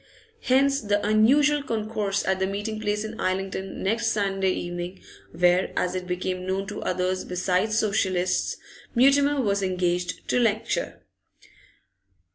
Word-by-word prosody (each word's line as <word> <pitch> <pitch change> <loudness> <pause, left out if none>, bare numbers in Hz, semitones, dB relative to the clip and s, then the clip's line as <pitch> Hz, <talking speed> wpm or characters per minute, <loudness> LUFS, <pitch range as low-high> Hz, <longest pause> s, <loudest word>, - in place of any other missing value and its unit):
Hence 275 +2 +3
the 205 -1 0
unusual 280 +8 +4
concourse 215 -5 -2
at 190 0 +1
the 190 - +1
meeting 205 +2 -4
place 210 0 -1
in 220 +1 -7
Islington 190 +1 -3
next 225 +4 0
Sunday 195 -3 +1
evening, 175 +1 -4 0.3
where, 180 +2 +2
as 180 - 0
it 185 -1 -4
became 180 0 -3
known 190 +1 -2
to - - -6
others 185 +1 -1
besides 185 +4 0
Socialists, 190 -4 0 0.4
Mutimer 280 +3 +4
was 200 -5 +1
engaged 180 -1 -1
to - - +2
lecture. 220 -3 -1
200 Hz, 130 wpm, -25 LUFS, 185-220 Hz, 0.4 s, unusual